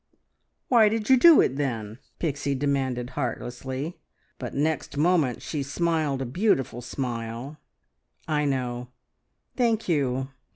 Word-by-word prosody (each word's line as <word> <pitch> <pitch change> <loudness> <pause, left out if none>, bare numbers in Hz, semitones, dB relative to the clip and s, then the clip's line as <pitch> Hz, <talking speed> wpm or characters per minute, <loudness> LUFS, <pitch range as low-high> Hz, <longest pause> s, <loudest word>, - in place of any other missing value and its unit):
"Why 225 -4 +6
did 220 +2 -1
you 260 - +8
do 330 +4 +8
it 130 - 0
then?" 115 -5 -3 0.2
Pixie 140 -3 -1
demanded 130 -3 -1
heartlessly, 130 +3 -4 0.4
but - - -6
next 150 0 -1
moment 155 -5 +2
she 150 - -3
smiled 150 -1 0
a - - -4
beautiful 135 - 0
smile. 120 +2 -5 0.7
"I 150 -2 +1
know! 125 -3 -2 0.7
Thank 230 -3 +1
you! 135 -5 0
140 Hz, 120 wpm, -26 LUFS, 125-165 Hz, 0.7 s, you